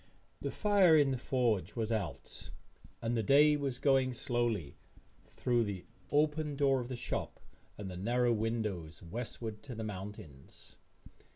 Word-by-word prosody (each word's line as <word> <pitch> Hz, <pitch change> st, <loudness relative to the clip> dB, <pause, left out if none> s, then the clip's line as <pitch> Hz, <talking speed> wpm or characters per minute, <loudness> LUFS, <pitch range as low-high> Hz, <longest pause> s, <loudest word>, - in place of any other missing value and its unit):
The -, -, -2 dB
fire 200 Hz, -6 st, +5 dB
in 145 Hz, -2 st, +4 dB
the 130 Hz, -, 0 dB
forge 120 Hz, -7 st, 0 dB
was 115 Hz, -1 st, -1 dB
out 100 Hz, -9 st, -4 dB, 0.5 s
and 115 Hz, +1 st, 0 dB
the 115 Hz, -, +1 dB
day 145 Hz, +6 st, +6 dB
was 140 Hz, -4 st, -2 dB
going 135 Hz, -2 st, +3 dB
slowly, 120 Hz, -, -1 dB, 0.5 s
through 120 Hz, -2 st, +1 dB
the 100 Hz, -4 st, -5 dB, 0.2 s
open 150 Hz, 0 st, +1 dB
door 135 Hz, -2 st, +3 dB
of 120 Hz, -, -4 dB
the 130 Hz, -, -4 dB
shop 120 Hz, -, -4 dB, 0.4 s
and 105 Hz, -, -6 dB
the 90 Hz, -1 st, -6 dB
narrow 120 Hz, +5 st, +2 dB
windows, 105 Hz, -8 st, -2 dB
westward 110 Hz, +3 st, -5 dB
to 125 Hz, 0 st, -8 dB
the 110 Hz, -, -4 dB
mountains. 95 Hz, -9 st, -9 dB
120 Hz, 150 wpm, -33 LUFS, 105-135 Hz, 0.5 s, day